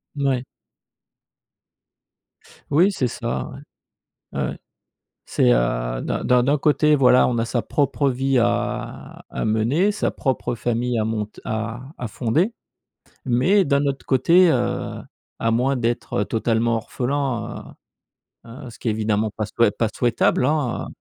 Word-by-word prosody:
Mouais. 135 Hz, -3 st, 0 dB, 2.3 s
Oui, 170 Hz, +7 st, +5 dB
c'est 135 Hz, -10 st, -1 dB
ça, 65 Hz, -, -4 dB, 0.6 s
ouais. -, -, -8 dB
Ouais, -, -, 0 dB
ouais. -, -, -6 dB, 0.7 s
C'est, -, -, +2 dB
heu, -, -, 0 dB
d'un -, -, -3 dB
d'un 125 Hz, -1 st, +4 dB
d'un 140 Hz, +4 st, +2 dB
côté, 150 Hz, +1 st, +3 dB
voilà, 125 Hz, -2 st, +5 dB
on 120 Hz, -2 st, 0 dB
a 115 Hz, -, 0 dB
sa 120 Hz, +1 st, -1 dB
propre 140 Hz, +1 st, 0 dB
vie 130 Hz, +1 st, 0 dB
à 120 Hz, +1 st, -2 dB
à -, -, -3 dB
mener, 120 Hz, -, +2 dB
sa 210 Hz, -, -1 dB
propre 125 Hz, -3 st, -2 dB
famille 120 Hz, +1 st, -1 dB
à 110 Hz, -, +1 dB
monte 110 Hz, -1 st, -4 dB
à 115 Hz, +2 st, -3 dB, 0.2 s
à 125 Hz, -, -4 dB
fonder, 135 Hz, -, 0 dB, 0.7 s
mais 175 Hz, +12 st, +3 dB
d'un 140 Hz, -1 st, +2 dB
autre 140 Hz, -1 st, -2 dB
côté, 170 Hz, +7 st, +5 dB
heu, -, -, -1 dB, 0.4 s
à 115 Hz, -, 0 dB
moins 125 Hz, +4 st, +1 dB
d'être, 120 Hz, -4 st, -1 dB
heu, -, -, 0 dB
totalement 115 Hz, +1 st, 0 dB
orphelin, 120 Hz, 0 st, -3 dB, 0.7 s
heu, 115 Hz, -, -13 dB, 0.2 s
heu, -, -, -8 dB
ce 115 Hz, -, -14 dB
qui -, -, -6 dB
est -, -, +2 dB
évidemment 110 Hz, 0 st, 0 dB
pas 110 Hz, -, -2 dB
souhait 110 Hz, +1 st, +2 dB
pas 110 Hz, +2 st, 0 dB
souhaitable, 120 Hz, +1 st, +2 dB
hein, 145 Hz, -4 st, -1 dB
120 Hz, 150 wpm, -22 LUFS, 115-140 Hz, 2.3 s, Oui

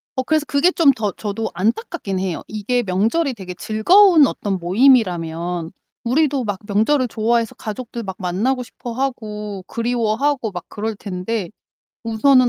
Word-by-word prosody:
어 260 Hz, -, 0 dB
그래서 310 Hz, +1 st, +1 dB
그게 295 Hz, +6 st, +3 dB
좀 315 Hz, -6 st, +5 dB
더 215 Hz, -6 st, -2 dB
저도 215 Hz, +1 st, -3 dB
안타깝기는 215 Hz, -, -1 dB
해요. 180 Hz, -3 st, -3 dB
이게 230 Hz, +4 st, -1 dB
명절이 225 Hz, -, +1 dB
되게 185 Hz, -4 st, -8 dB
즐거운 320 Hz, -, +5 dB
어떤 195 Hz, -2 st, -2 dB
모임이라면 175 Hz, -6 st, +2 dB, 0.3 s
우리도 275 Hz, +1 st, +1 dB
막 205 Hz, -3 st, -3 dB
명절을 245 Hz, +6 st, +2 dB
좋아해서 230 Hz, 0 st, 0 dB
가족들 230 Hz, +2 st, -6 dB
막 190 Hz, -2 st, -5 dB
만나고 210 Hz, +9 st, 0 dB
싶어하고 215 Hz, -5 st, -5 dB
그리워하고 235 Hz, +1 st, 0 dB
막 180 Hz, -2 st, -7 dB
그럴 220 Hz, +1 st, -3 dB
텐데 195 Hz, 0 st, -4 dB, 0.5 s
우선은 250 Hz, +3 st, +4 dB
225 Hz, 330 characters per minute, -20 LUFS, 200-260 Hz, 0.5 s, 좀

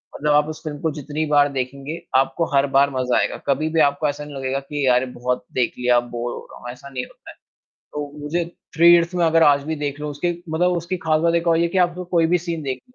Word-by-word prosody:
मतलब 150 Hz, +1 st, +1 dB
आप 150 Hz, 0 st, +4 dB
उस 155 Hz, -, -8 dB
फ़िल्म 150 Hz, -2 st, -5 dB
को 160 Hz, -, 0 dB
जितनी 150 Hz, +1 st, -4 dB
बार 145 Hz, 0 st, +5 dB
देखेंगे, 135 Hz, +5 st, -4 dB
आपको 135 Hz, +5 st, +2 dB
हर 140 Hz, +1 st, +4 dB
बार 140 Hz, +1 st, +5 dB
मज़ा 130 Hz, -1 st, 0 dB
आएगा, -, -, -1 dB
कभी-भी 155 Hz, +3 st, +1 dB
आपको 145 Hz, +1 st, +2 dB
ऐसा 145 Hz, +1 st, -5 dB
नहीं 145 Hz, -1 st, -10 dB
लगेगा 135 Hz, 0 st, -2 dB
कि 140 Hz, 0 st, -3 dB
यार 125 Hz, -1 st, +4 dB
ये -, -, -2 dB
बहुत 125 Hz, +1 st, -2 dB
देख 125 Hz, -2 st, 0 dB
लिया 125 Hz, 0 st, +3 dB
अब 120 Hz, 0 st, -1 dB
बोर 120 Hz, 0 st, -3 dB
हो -, -, -8 dB
रहा -, -, -12 dB
हूँ, 120 Hz, -, -8 dB
ऐसा 130 Hz, +3 st, -12 dB
नहीं 130 Hz, -2 st, -4 dB
होता -, -, -17 dB
है, -, -, -18 dB, 0.6 s
तो 145 Hz, -1 st, -5 dB
मुझे 165 Hz, +4 st, -1 dB, 0.3 s
थ्री 165 Hz, +2 st, +5 dB
इडियट्स 170 Hz, +1 st, +5 dB
मैं, 175 Hz, -1 st, +2 dB
अगर 165 Hz, 0 st, +4 dB
आज 140 Hz, -2 st, +4 dB
भी 160 Hz, +1 st, -2 dB
देख 145 Hz, -1 st, -4 dB
लूँ, 150 Hz, -, -4 dB
उसके 160 Hz, +5 st, -1 dB, 0.2 s
मतलब 175 Hz, +3 st, +1 dB
उसकी 175 Hz, +2 st, -3 dB
ख़ास 155 Hz, -1 st, +2 dB
बात 170 Hz, 0 st, +2 dB
एक 170 Hz, 0 st, 0 dB
और 165 Hz, -1 st, +4 dB
ये 170 Hz, -, +2 dB
है 170 Hz, -, 0 dB
कि 190 Hz, -, -2 dB
आपको 175 Hz, +1 st, -7 dB
कोई 165 Hz, -1 st, +4 dB
भी -, -, +5 dB
सीन 165 Hz, -2 st, -2 dB
देख 130 Hz, -2 st, -3 dB
145 Hz, 270 wpm, -21 LUFS, 135-165 Hz, 0.6 s, बार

